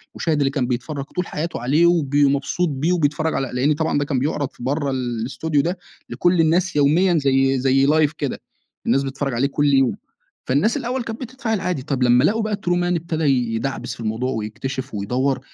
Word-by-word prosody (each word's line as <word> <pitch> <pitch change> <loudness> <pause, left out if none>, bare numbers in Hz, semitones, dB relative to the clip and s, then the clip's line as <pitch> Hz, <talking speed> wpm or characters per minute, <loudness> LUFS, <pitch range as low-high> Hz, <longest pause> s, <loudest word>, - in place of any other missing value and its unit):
المُشاهد 160 -3 0
اللي 135 -1 +2
كان 135 -3 -1
بيتفرج 135 +3 -3
طول 180 +4 -4
حياته 165 +3 -4
عليه 145 +8 +3
وب 160 -5 +2
مبسوط 145 +4 +2
بيه 150 +5 0
وبيتفرج 155 -1 0
على 135 -1 -1
لأن 135 +4 +2
طبعًا 160 +1 0
ده 145 - 0
كان 140 -3 -1
بيعرض 145 0 -1
في - - -13
برّه 140 +2 -1
ال 125 -3 -2
الأستوديو 140 +5 0
ده 175 +5 -2 0.3
لكل 175 -1 +2
الناس 175 +3 +1
يوميًا 165 +5 +3
زي 135 -2 +2
زي 135 +1 +3
لايڤ 155 -1 +3
كده 140 -3 -3 0.4
الناس 135 - +2
بتتفرج 135 0 -3
عليه 125 +4 +1
كل 145 0 +1
يوم، 135 -2 +3 0.5
فالناس 145 - +2
الأوّل 250 -1 -2
كانت 230 +1 -6
بتتفاعل 245 -4 -3
عادي 180 -7 -2
طب 135 -3 -1
لمّا 125 +1 +5
لقوا 220 +8 +2
بقى 215 -1 -1
ترومان 175 -2 0
ابتدى 165 -1 -2 0.3
يدعبِس 125 +1 -3
في - - -21
الموضوع 115 +4 -2
ويكتشف 130 +4 -5
ويدور، 125 +7 0
145 Hz, 195 wpm, -21 LUFS, 130-170 Hz, 0.5 s, لمّا